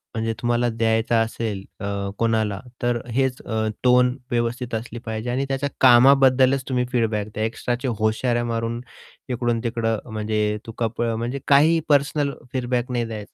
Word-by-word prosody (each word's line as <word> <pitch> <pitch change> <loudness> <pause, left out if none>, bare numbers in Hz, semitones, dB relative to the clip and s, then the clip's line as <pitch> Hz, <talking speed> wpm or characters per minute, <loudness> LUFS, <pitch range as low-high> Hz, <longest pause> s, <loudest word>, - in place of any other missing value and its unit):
म्हणजे 115 0 -1
तुम्हाला 120 0 +1
द्यायचा 115 0 +1
असेल, 110 -3 -3 0.2
अ, 100 -1 -3
कोणाला. 110 -3 0 0.2
तर 120 -1 +1
हेच 130 -1 0
अ, 110 -1 -2 0.2
टोन 125 0 +4
व्यवस्थित 120 +1 -1
असली 115 +1 -5
पाहिजे 110 +1 -4
आणि 130 +3 0
त्याच्या 135 +1 -1
कामाबद्दलच 130 +1 +6
तुम्ही 125 -1 +1
फीडबॅक 110 -4 0
द्या. 110 - -2
एक्स्ट्राचे 120 +3 -2
होशाऱ्या 120 +2 +1
मारून 115 0 -2 0.5
इकडून 120 -2 0
तिकडं 115 -2 -1
म्हणजे 105 -1 -1
तुका 115 0 -2
प - - -2 0.2
म्हणजे 120 +4 -3
काही 155 +4 +5
पर्सनल 145 0 +2 0.2
फीडबॅक 125 -1 -1
नाही 120 -1 0
द्यायचं. 110 -3 -8
120 Hz, 150 wpm, -23 LUFS, 110-125 Hz, 0.5 s, कामाबद्दलच